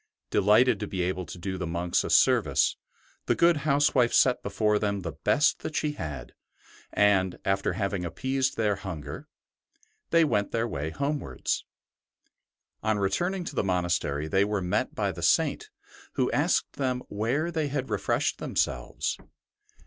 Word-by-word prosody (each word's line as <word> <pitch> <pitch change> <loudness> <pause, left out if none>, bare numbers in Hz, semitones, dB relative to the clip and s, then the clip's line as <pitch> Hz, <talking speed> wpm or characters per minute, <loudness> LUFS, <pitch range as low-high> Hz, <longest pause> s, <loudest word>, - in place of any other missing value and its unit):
Delighted 105 +3 +4
to 105 - -4
be 95 -2 -2
able 90 -1 -2
to 90 - -8
do 95 +1 -4
the 90 - -3
monks 85 +1 0
a - - -4
service, - - +3 0.5
the - - +3
good 170 -1 +4
housewife 140 -4 +2
set 125 -2 +4
before 105 +1 +1
them 100 -2 -1
the 85 -2 -4
best 145 - +2
that 155 - -6
she 150 - 0
had, 75 - -7 0.6
and, 95 -3 +3
after 95 -1 +1
having 100 -1 -2
appeased 130 +9 -1
their 105 -3 +1
hunger, 90 -7 -7 0.8
they 165 0 +5
went 105 -8 0
their 115 +1 0
way 75 -6 -3
homewards. 140 - -2 1.2
On 110 -1 +1
returning 175 - 0
to 165 - -6
the - - +1
monastery 85 -5 0
they 95 +4 +3
were 105 0 -1
met 90 -1 -1
by - - 0
the - - -8
Saint, - - +2 0.4
who - - 0
asked - - +1
them 130 -2 -1
where 125 +11 -1
they 160 -3 -1
had 135 -2 -3
refreshed - - 0
themselves. - - -2
105 Hz, 155 wpm, -27 LUFS, 90-135 Hz, 1.2 s, they